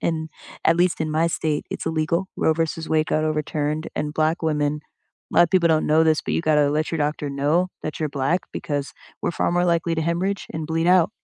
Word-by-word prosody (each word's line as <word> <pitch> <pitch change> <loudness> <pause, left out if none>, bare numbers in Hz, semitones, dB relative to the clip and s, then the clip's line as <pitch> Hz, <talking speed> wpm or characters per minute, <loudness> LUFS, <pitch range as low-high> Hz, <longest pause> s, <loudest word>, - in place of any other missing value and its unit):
and, 160 -1 -1 0.4
at 165 - +4
least 175 -1 +2
in 155 -1 -1
my 160 +2 +2
state, 155 -2 -1
it's - - -5
illegal. 160 +3 0
Roe 160 - +3
versus 165 0 -2
Wade 155 0 +2
got 155 0 0
overturned, 150 0 -1
and 150 0 -2
Black 160 +2 0
women 150 -1 0 0.5
a - - -4
lot - - +9
of - - -5
people 180 -3 +4
don't 155 -1 +2
know 155 +1 +4
this, 160 -1 +3
but - - -3
you - - 0
gotta 150 -3 +3
let 155 +2 -1
your 165 - -1
doctor 150 -1 -1
know 150 +6 +1
that 155 - -5
you're 155 -2 -2
Black, 140 +6 0
because 145 -2 -3 0.3
we're - - 0
far 170 - 0
more 175 +1 +2
likely 170 -1 +1
to 160 - -1
hemorrhage 180 +5 -1
and 160 -1 -4
bleed 165 +1 0
out. 180 0 +5
160 Hz, 230 wpm, -23 LUFS, 150-170 Hz, 0.5 s, lot